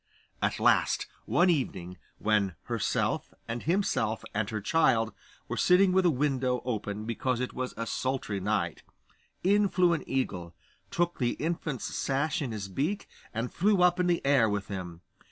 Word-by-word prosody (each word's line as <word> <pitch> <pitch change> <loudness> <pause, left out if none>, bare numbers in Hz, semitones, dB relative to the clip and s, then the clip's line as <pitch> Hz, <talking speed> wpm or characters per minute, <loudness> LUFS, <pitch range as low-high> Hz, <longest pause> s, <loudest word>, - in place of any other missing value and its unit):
At - - 0
last, - - +3 0.2
one 175 - +4
evening, 90 - -2 0.2
when 105 -4 +1
herself, - - -1 0.2
and 115 +1 -3
himself, 155 - 0
and 105 0 -1
her 110 - -2
child 115 -3 +2 0.3
were - - -3
sitting 185 +1 +5
with 185 0 +4
a - - +5
window 130 -3 0
open 105 -3 -3
because 120 +2 -1
it 125 - -3
was 130 0 -4
a 115 - -2
sultry 130 -4 -2
night, 95 -4 -1 0.6
in 200 +2 +4
flew 180 -2 +3
an 165 - -2
eagle, 90 -11 -2 0.3
took 175 0 0
the 120 -2 +1
infant's 160 -5 -3
sash 145 +3 0
in 130 -5 -2
his 105 -3 -4
beak, 150 - -2 0.2
and 115 +2 -3
flew 195 0 +3
up 180 0 +4
in 180 - +2
the 175 -4 +1
air 135 -6 +4
with 100 -1 -2
him. 90 -4 -6
125 Hz, 165 wpm, -29 LUFS, 110-170 Hz, 0.6 s, sitting